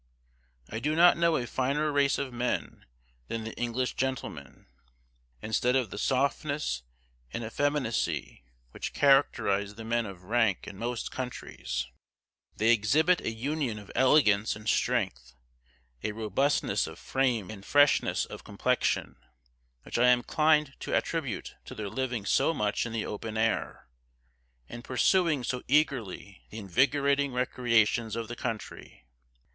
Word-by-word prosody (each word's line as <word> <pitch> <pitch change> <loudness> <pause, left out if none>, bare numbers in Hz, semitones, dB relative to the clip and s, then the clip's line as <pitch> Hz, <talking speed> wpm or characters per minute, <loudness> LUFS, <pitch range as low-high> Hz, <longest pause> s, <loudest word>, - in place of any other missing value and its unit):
I 110 - -5
do 150 +6 0
not 175 +2 +7
know 170 -1 +2
a 120 - -2
finer 140 +5 0
race 140 -1 +2
of 130 -3 -4
men 120 +1 -3 0.4
than 115 - -4
the 110 - -6
English 120 +1 -2
gentlemen. 80 - -4 0.8
Instead 120 +3 +1
of 130 -4 0
the - - -5
softness 140 - 0 0.5
and 115 - -4
effeminacy 110 - -1 0.3
which - - -6
characterize 105 -8 +3
the 115 - -8
men 115 0 0
of 95 -2 -10
rank 110 -1 +1
in 100 -1 -9
most 120 0 -3
countries, 65 - -4 0.7
they 110 +2 +4
exhibit 150 - +3
a - - -2
union 130 0 -2
of 105 -2 -11
elegance 110 -6 +4
and 105 0 -10
strength, 65 - 0 0.7
a 105 - -3
robustness 115 +7 0
of - - -9
frame 125 -7 0
and 100 -3 -10
freshness 145 +5 +3
of - - -10
complexion, - - -1 0.7
which - - -3
I 125 - +5
am 125 0 +5
inclined 150 +1 +2
to - - -2
attribute 140 - -3
to - - -9
their 105 -2 -4
living 125 -3 -3
so 165 - +2
much 105 -1 0
in - - -7
the 115 -1 -2
open 110 +1 -5
air, 110 +1 -1 0.8
and 120 +8 -9
pursuing 155 +2 +2
so 125 +1 -2
eagerly 120 -9 0
the 110 - -9
invigorating 140 +6 +1
recreations 115 -3 +1
of 115 -1 -4
the 120 - -5
country. 115 - -6
120 Hz, 140 wpm, -29 LUFS, 105-140 Hz, 0.8 s, not